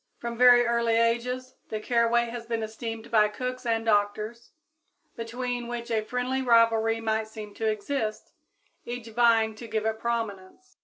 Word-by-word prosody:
From 235 Hz, 0 st, -5 dB
very 245 Hz, 0 st, +7 dB
early 235 Hz, -1 st, +2 dB
ages 245 Hz, +3 st, 0 dB, 0.2 s
the 215 Hz, -, -3 dB
caraway 235 Hz, +1 st, +2 dB
has 235 Hz, -1 st, -7 dB
been 230 Hz, -1 st, -2 dB
esteemed 225 Hz, +1 st, -6 dB
by 215 Hz, -2 st, +5 dB
cooks 250 Hz, +4 st, -5 dB
and 225 Hz, 0 st, 0 dB
doctors, 215 Hz, +2 st, 0 dB, 0.7 s
between 245 Hz, +1 st, -4 dB
which 240 Hz, 0 st, -5 dB
a 220 Hz, -1 st, +2 dB
friendly 250 Hz, +3 st, -2 dB
rivalry 230 Hz, -2 st, +3 dB
might 220 Hz, -1 st, -1 dB
seem 215 Hz, -1 st, -9 dB
to 220 Hz, +1 st, -1 dB
exist, 215 Hz, +1 st, -3 dB, 0.5 s
each 240 Hz, -1 st, -6 dB
vying 225 Hz, -1 st, +3 dB
to 230 Hz, +2 st, -10 dB
give 220 Hz, -1 st, -2 dB
it 220 Hz, 0 st, -1 dB
prominence. 225 Hz, -, -4 dB
230 Hz, 155 wpm, -27 LUFS, 220-240 Hz, 0.7 s, very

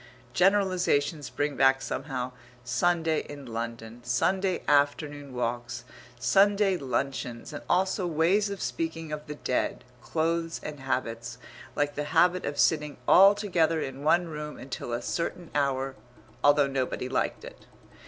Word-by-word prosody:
Generalizations 180 Hz, -5 st, +2 dB
bring 145 Hz, 0 st, -2 dB
back 135 Hz, 0 st, +4 dB
somehow 130 Hz, -2 st, -4 dB, 0.3 s
Sunday 160 Hz, +4 st, +1 dB
in 145 Hz, -1 st, -8 dB
London, 115 Hz, 0 st, -6 dB
Sunday 180 Hz, +9 st, +1 dB
afternoon 145 Hz, 0 st, +1 dB
walks, 120 Hz, 0 st, -3 dB, 0.4 s
Sunday 195 Hz, -, +4 dB
luncheons, 130 Hz, -3 st, -3 dB
and 145 Hz, -, -6 dB
also 185 Hz, 0 st, +1 dB
ways 175 Hz, +6 st, +2 dB
of 200 Hz, -1 st, -5 dB
speaking 165 Hz, -1 st, -3 dB
of 150 Hz, 0 st, -5 dB
the 150 Hz, -, -5 dB
dead, 125 Hz, -3 st, -1 dB, 0.2 s
clothes, 165 Hz, +3 st, -1 dB
and 150 Hz, -2 st, -6 dB
habits 120 Hz, -3 st, -3 dB, 0.4 s
like 145 Hz, 0 st, 0 dB
the 150 Hz, 0 st, -3 dB
habit 175 Hz, +4 st, +3 dB
of 145 Hz, -, -4 dB
sitting 150 Hz, -2 st, +2 dB
all 195 Hz, +2 st, +8 dB
together 170 Hz, -6 st, +1 dB
in 135 Hz, -2 st, -5 dB
one 170 Hz, +3 st, +3 dB
room 150 Hz, -1 st, -6 dB
until 130 Hz, -2 st, -6 dB
a 120 Hz, 0 st, -2 dB
certain 170 Hz, +3 st, -3 dB
hour, 135 Hz, -2 st, 0 dB, 0.5 s
although 145 Hz, 0 st, +6 dB
nobody 130 Hz, -2 st, -2 dB
liked 130 Hz, -, -1 dB
it. -, -, -13 dB
145 Hz, 135 wpm, -28 LUFS, 130-170 Hz, 0.5 s, all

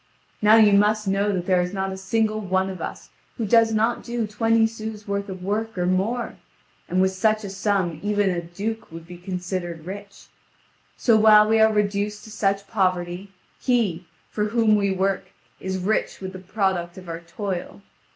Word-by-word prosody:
Now 210 Hz, +1 st, +7 dB
you 215 Hz, -2 st, +6 dB
must 210 Hz, +1 st, +3 dB
know 200 Hz, +2 st, +1 dB
that 180 Hz, -3 st, -2 dB
there 185 Hz, -1 st, +3 dB
is 180 Hz, +2 st, -3 dB
not 190 Hz, 0 st, -2 dB
a -, -, -4 dB
single 215 Hz, +3 st, 0 dB
one 190 Hz, -1 st, 0 dB
of 185 Hz, -, -8 dB
us -, -, -7 dB, 0.3 s
who 230 Hz, -, -1 dB
does 225 Hz, +2 st, +4 dB
not 225 Hz, +2 st, +1 dB
do 235 Hz, -1 st, -2 dB
twenty 225 Hz, +2 st, +2 dB
sous 220 Hz, -1 st, -6 dB
worth 200 Hz, 0 st, -2 dB
of 185 Hz, -1 st, -7 dB
work 220 Hz, +2 st, -2 dB
or 180 Hz, -, 0 dB
more, 195 Hz, +7 st, -1 dB, 0.5 s
and 180 Hz, -, +1 dB
with 190 Hz, 0 st, +3 dB
such 215 Hz, +3 st, +1 dB
a 200 Hz, -, -5 dB
sum 195 Hz, -5 st, 0 dB
even 205 Hz, -1 st, +1 dB
a 175 Hz, -1 st, -2 dB
duke 200 Hz, +5 st, -5 dB
would 165 Hz, 0 st, -9 dB
be 175 Hz, 0 st, -11 dB
considered 180 Hz, -2 st, -4 dB
rich. 200 Hz, +1 st, -9 dB, 0.7 s
So 230 Hz, -, +4 dB
while 215 Hz, -1 st, +7 dB
we 220 Hz, 0 st, +3 dB
are 220 Hz, 0 st, +6 dB
reduced 210 Hz, 0 st, -1 dB
to 220 Hz, -, -11 dB
such 200 Hz, -2 st, 0 dB
poverty, 185 Hz, -2 st, -1 dB, 0.3 s
he, 200 Hz, -9 st, 0 dB, 0.2 s
for 210 Hz, -, -1 dB
whom 220 Hz, 0 st, +3 dB
we 200 Hz, -1 st, +1 dB
work, 190 Hz, 0 st, 0 dB, 0.3 s
is 190 Hz, 0 st, -3 dB
rich 190 Hz, +4 st, -1 dB
with 190 Hz, -1 st, -6 dB
the 185 Hz, -, -7 dB
product 190 Hz, -2 st, -1 dB
of 185 Hz, -1 st, -11 dB
our 165 Hz, 0 st, -5 dB
toil. 185 Hz, +2 st, -5 dB
200 Hz, 190 wpm, -23 LUFS, 185-215 Hz, 0.7 s, Now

